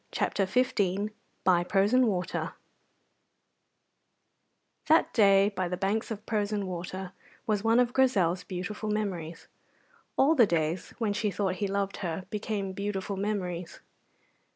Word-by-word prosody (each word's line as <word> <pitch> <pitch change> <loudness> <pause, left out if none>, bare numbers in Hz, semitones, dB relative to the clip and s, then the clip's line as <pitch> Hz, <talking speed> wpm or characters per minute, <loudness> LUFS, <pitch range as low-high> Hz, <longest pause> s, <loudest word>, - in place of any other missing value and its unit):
CHAPTER 195 -2 0
XV 205 -3 +1 0.3
BY 175 -2 +4
PROSEN 210 +7 +3
WATER 185 -4 -2 2.3
That 320 +2 +4
day 200 -3 +5
by 185 -3 -2
the 180 +1 -3
banks 200 +4 -1
of 215 -1 -6
Prosen 210 -2 -1
Water 185 +1 -5 0.3
was 210 -3 0
one 225 +2 +4
of 245 0 +2
Grizel's 190 -10 +2
beautiful 190 +4 -5
memories. 170 -6 -3 0.7
All 285 +4 +5
the 245 -8 +5
days 165 0 -1
when 220 -4 0
she 210 +1 0
thought 190 0 -1
he 205 - -1
loved 200 0 -2
her 180 -1 -4
became 205 -2 -3
beautiful 200 0 -3
memories. 180 -4 -3
200 Hz, 130 wpm, -29 LUFS, 185-215 Hz, 2.3 s, day